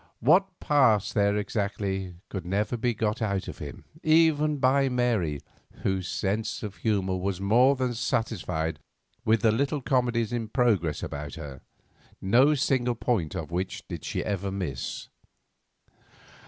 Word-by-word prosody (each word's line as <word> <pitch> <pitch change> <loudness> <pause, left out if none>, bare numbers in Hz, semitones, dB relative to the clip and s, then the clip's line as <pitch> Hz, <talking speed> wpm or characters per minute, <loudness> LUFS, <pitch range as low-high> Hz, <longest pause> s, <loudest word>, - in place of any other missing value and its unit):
What 180 - +3
passed 120 -9 +3
there 100 -1 +2
exactly, 100 -3 -2
could 95 -3 -4
never 100 +6 -1
be 120 0 0
got 105 +1 -1
out 100 -3 -1
of - - -7
him, - - -8 0.2
even 155 -2 +4
by 135 +1 +3
Mary, 115 - 0 0.4
whose 95 -2 0
sense 105 +4 -2
of 105 -2 -6
humour 95 -4 0
was 95 0 -2
more 120 +8 +4
than 130 -2 -1
satisfied 90 -9 -2 0.5
with 110 0 +3
the 115 -2 +4
little 140 +6 0
comedies 120 -4 +1
in 115 -2 -2
progress 105 - +1
about 70 0 -5
her, 70 -5 -8 0.6
no 130 +10 +4
single 125 -3 +1
point 110 -9 -1
of 80 0 -5
which 90 +2 -3
did - - -6
she - - -3
ever 100 -1 -2
miss. 85 -11 -4
110 Hz, 140 wpm, -27 LUFS, 95-125 Hz, 0.6 s, even